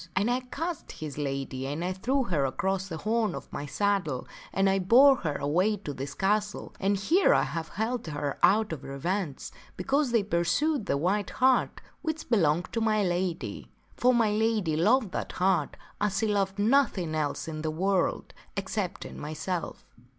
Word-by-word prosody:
And 205 +5 +2
I 250 - +1
catched 310 +6 -5
his 150 -2 -7
lady 135 -2 -3
and 150 +5 -3
I 185 - -1
threw 260 +9 0
her 170 - 0
across 190 +8 -1
the 165 -4 -5
horn 215 +1 0
of - - -9
my 145 - -4
saddle 185 -7 0 0.2
and 195 0 +2
I 195 0 +3
bore 260 +9 +6
her 155 -9 -2
here - - -5
away 180 +9 +2
to 170 -7 -6
this 135 +1 -6
castle, 210 +2 -1
and 200 +1 +1
here 335 - +4
I - - +3
have 160 +4 -4
held 225 +2 -2
her 145 -2 -3
out 215 -1 +4
of 145 - -7
revenge. 150 +3 -3 0.3
because 280 0 +1
they 230 -3 +3
pursued 210 - 0
the - - +1
white 190 +6 0
hart 260 -1 +2 0.2
which 315 -3 -4
belonged 170 -5 +2
to 230 - 0
my 215 -2 +2
lady. 175 -1 -2 0.3
For 250 - +4
my 230 -4 +3
lady 215 -6 +1
loved 215 +6 +3
that - - -4
hart 180 -5 +1 0.2
as 205 -2 +1
she 225 - +1
loved 200 -2 0
nothing 210 - +2
else 155 -1 -2
in 155 -1 -5
the 155 - -1
world, 185 +4 0 0.2
excepting 195 -1 -4
myself." 155 +4 -4
195 Hz, 180 wpm, -28 LUFS, 160-220 Hz, 0.3 s, bore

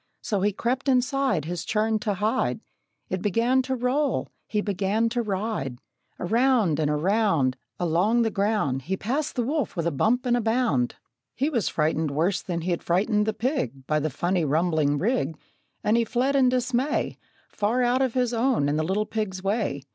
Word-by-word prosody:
So 205 -5 -1
he 205 +2 +2
crept 255 +7 -1
inside 255 - +1
His 175 0 -4
churn 215 0 0
to 205 -1 -1
hide; 215 +7 0 0.5
It 185 - -2
began 230 +6 +2
to 260 0 -2
roll; 260 +3 0 0.2
he 210 - -1
began 205 +3 0
to 240 +1 -1
ride; 200 - -3 0.4
Around 225 - +2
and 150 -2 +1
around, 160 - +2 0.2
Along 180 +8 +2
the 225 - 0
ground, 200 -11 0
He 190 +8 -3
passed 275 +10 -2
the 245 - 0
wolf 280 +1 -1
with 170 -2 -2
a 170 - +1
bump 230 - +1
and 240 -1 +2
bound. 220 - +1 0.4
He 280 +4 0
was 235 - 0
frightened 155 0 0
worse 170 +7 0
than 170 -3 -3
he'd 175 0 -1
frightened 210 +4 +1
the 220 - +1
pig, 175 - -2
By 155 +2 +1
the 155 +1 -1
funny, 175 +5 0
rumbling 155 -1 +1
rig; 200 - 0 0.5
And 215 - +3
he 235 - +3
fled 255 +5 0
in 260 -2 +5
dismay 255 +3 0 0.3
Far 225 +5 0
out 245 +2 +2
of 260 -2 0
his 250 -2 +1
own 235 - +2
and 150 +2 0
the - - +1
little 195 +6 0
pig's 200 -5 -3
way. 195 - -1
210 Hz, 180 wpm, -25 LUFS, 170-245 Hz, 0.5 s, in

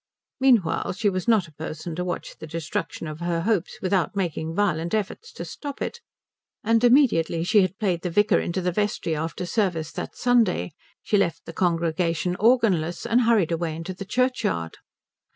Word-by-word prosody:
Meanwhile 240 -14 +3
she 205 +3 +1
was 185 +1 -3
not 215 -7 +3
a 155 - -18
person 155 +2 -6
to 180 - -2
watch 180 -1 -4
the 160 - -8
destruction 165 +1 -4
of 155 0 -6
her 170 -1 -1
hopes 200 -1 0
without 190 0 +1
making 165 -4 -2
violent 175 -2 +1
efforts 220 - -4
to - - -6
stop 285 -2 -7
it; 470 - -4 0.6
and 230 +2 +2
immediately 235 - +4
she 210 +4 +4
had 185 0 -1
played 185 -5 0
the 180 - -2
vicar 205 +5 +3
into 180 +2 -2
the 180 0 0
vestry 205 -4 -1
after 165 +3 -3
service 175 -5 -1
that - - -6
Sunday 235 -8 +2 0.3
she 210 - +2
left 170 -5 0
the 165 - -8
congregation 170 0 0
organless 210 -9 +2
and 235 +1 +3
hurried 225 -8 +3
away 165 -1 -1
into 165 +3 -5
the 185 - -7
churchyard. 230 - -1
180 Hz, 175 wpm, -24 LUFS, 165-220 Hz, 0.6 s, immediately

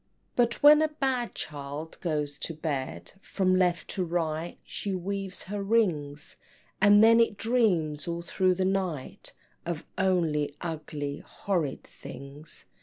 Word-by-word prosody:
But 240 +1 +1
when 300 +1 +9
a 315 - +4
bad 265 -5 -1
child 145 +2 -6
goes 150 -4 -2
to 165 - -3
bed, 135 - -4
From 185 -2 +1
left 180 -3 +2
to 190 - -1
right 165 -1 -2
she 200 -2 -4
weaves 195 +1 -4
her 205 +2 -4
rings, 165 -10 0 0.4
And 205 +1 +7
then 230 +1 +7
it 230 -3 +3
dreams 180 -12 +1
all 170 0 -3
through 185 +1 +2
the 185 +1 0
night 185 -8 -2 0.3
Of 170 -3 -4
only 165 -6 +1
ugly 150 -3 -4
horrid 170 -9 -2
things! 140 +3 -10
175 Hz, 135 wpm, -28 LUFS, 150-200 Hz, 0.4 s, when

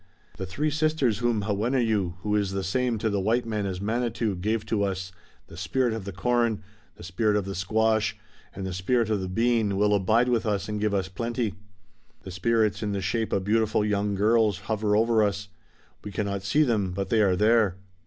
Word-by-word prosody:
"The 95 - -5
Three 150 +12 -1
Sisters 155 -8 +1
whom 120 -4 0
Hawenneu, 105 -3 0
who 105 0 0
is 100 -2 0
the 95 0 -2
same 120 +5 0
to 110 - -1
the 100 - 0
white 115 +5 +1
man 105 -3 -2
as 95 -1 -4
Manitou, 115 0 -1
gave 110 +4 -1
to 105 -1 -1
us, 95 -2 -2 0.3
the 80 - -13
spirit 120 +7 0
of 110 -4 -5
the 100 - -5
Corn, 115 +2 0 0.3
the - - -13
spirit 105 +4 0
of 105 -2 0
the 95 - -4
Squash 110 +3 +1 0.3
and 95 0 -6
the 95 - -4
spirit 110 +5 0
of 105 -3 0
the 95 - -4
Bean 110 -1 +1
will 105 +1 +3
abide 110 +5 +3
with 120 -2 +1
us 100 -2 -1
and 105 -1 -3
give 105 -1 +1
us 95 -2 0
plenty. 115 +2 -2 0.7
The 95 - -8
spirits 110 +3 +1
in 105 -2 -2
the 100 - -2
shape 110 +5 -1
of 95 - 0
beautiful 110 +1 +1
young 105 -1 0
girls 105 -1 +2
hover 105 0 0
over 115 +1 +3
us. 100 -1 -2 0.5
We 105 - -6
cannot 100 0 -2
see 105 +11 +2
them, 105 -9 0
but 95 0 -3
they 110 0 +3
are 95 -3 +3
there." 105 -1 +3
105 Hz, 205 wpm, -26 LUFS, 95-115 Hz, 0.7 s, will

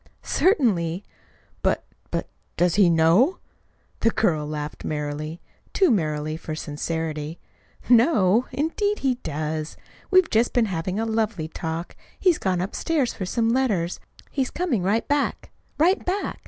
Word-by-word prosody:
"Certainly." 200 - +2 0.6
"But - - +1 0.3
but - - -2 0.3
does 175 -1 +3
he 200 -4 +5
know?" 170 - +4 0.6
The 230 - +3
girl 155 -10 +1
laughed 150 0 -5
merrily 150 +2 -4 0.3
too 380 -7 +4
merrily 155 -5 0
for 160 -1 -5
sincerity. 155 +1 -4 0.5
"Know? 235 - +4
Indeed 405 +8 0
he 255 -2 +1
does. 155 0 -3 0.3
We've 370 -2 +5
just 225 +2 +2
been 240 -2 +3
having 185 0 -2
a 225 - 0
lovely 220 -7 -1
talk. 165 +1 -5 0.2
He's 360 -4 +3
gone 185 -2 0
upstairs 260 - -1
for 185 - -5
some 225 +3 +1
letters. 215 -9 +1 0.3
He's 270 -3 0
coming 320 - -1
right 205 +5 +1
back 290 0 -1 0.3
right 345 +6 +3
back." 385 +3 -2
190 Hz, 135 wpm, -24 LUFS, 160-255 Hz, 0.6 s, he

